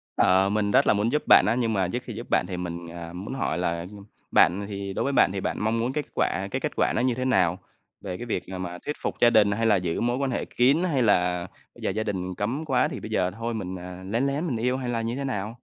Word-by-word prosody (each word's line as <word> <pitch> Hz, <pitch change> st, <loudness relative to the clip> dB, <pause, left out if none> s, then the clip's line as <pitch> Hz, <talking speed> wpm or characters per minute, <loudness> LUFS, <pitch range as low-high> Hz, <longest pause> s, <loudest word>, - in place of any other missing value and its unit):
Ờ, 95 Hz, +1 st, +4 dB
mình 105 Hz, 0 st, 0 dB
rất -, -, +4 dB
là -, -, +6 dB
muốn 105 Hz, +3 st, 0 dB
giúp 150 Hz, -, 0 dB
bạn -, -, +8 dB
á, -, -, +2 dB
nhưng 115 Hz, -3 st, 0 dB
mà 95 Hz, -3 st, +1 dB
trước 90 Hz, -, -4 dB
khi -, -, -7 dB
giúp -, -, -8 dB
bạn -, -, +2 dB
thì 90 Hz, -, -4 dB
mình, 85 Hz, -1 st, -5 dB
à, 85 Hz, -1 st, -8 dB
muốn 95 Hz, +8 st, -6 dB
hỏi 130 Hz, -11 st, -1 dB
là, 85 Hz, -1 st, -1 dB
ừm, 100 Hz, +3 st, -10 dB, 0.3 s
bạn 95 Hz, +4 st, +4 dB
thì 100 Hz, -1 st, -5 dB
đối -, -, -1 dB
với 140 Hz, -, -1 dB
bạn 95 Hz, -, +4 dB
thì 95 Hz, -, -3 dB
bạn -, -, -2 dB
mong 115 Hz, +2 st, +1 dB
muốn 125 Hz, +3 st, -1 dB
kết 150 Hz, -, -2 dB
quả 95 Hz, +3 st, 0 dB
cái -, -, -1 dB
kết -, -, -1 dB
quả -, -, +2 dB
nó -, -, +1 dB
như 125 Hz, -2 st, +1 dB
thế 130 Hz, -, -2 dB
nào? 95 Hz, -7 st, +2 dB, 0.4 s
Về 90 Hz, -2 st, -5 dB
cái 120 Hz, -, -6 dB
việc, 110 Hz, -6 st, -2 dB
à, 95 Hz, 0 st, -6 dB
mà 90 Hz, -1 st, -5 dB
thuyết 150 Hz, -, -2 dB
phục -, -, -2 dB
gia 120 Hz, -, +7 dB
đình, 105 Hz, -3 st, +4 dB
hay 115 Hz, +3 st, 0 dB
là 110 Hz, -, +5 dB
giữ 90 Hz, -3 st, -1 dB
mối 120 Hz, +1 st, +1 dB
quan 135 Hz, -1 st, -1 dB
hệ -, -, -2 dB
kín, 130 Hz, +4 st, +3 dB
hay 145 Hz, -8 st, +1 dB
là 90 Hz, -4 st, +2 dB, 0.3 s
giờ -, -, -3 dB
gia 110 Hz, +3 st, -2 dB
đình 95 Hz, -3 st, -3 dB
cấm 130 Hz, +10 st, -2 dB
quá 130 Hz, -4 st, +2 dB
thì -, -, -6 dB
bây 110 Hz, -, -8 dB
giờ 95 Hz, -4 st, +1 dB
thôi 115 Hz, +3 st, -4 dB
mình, 95 Hz, -4 st, -4 dB
à, 90 Hz, +1 st, -9 dB
lén 115 Hz, +6 st, 0 dB
lén 140 Hz, +5 st, -1 dB
mình 125 Hz, -7 st, -1 dB
yêu, 125 Hz, +3 st, 0 dB
hay 130 Hz, -2 st, -4 dB
là 115 Hz, -1 st, -1 dB
như 115 Hz, +2 st, -2 dB
thế 140 Hz, -, -3 dB
nào? 110 Hz, -5 st, -3 dB
105 Hz, 295 wpm, -26 LUFS, 90-120 Hz, 0.4 s, bạn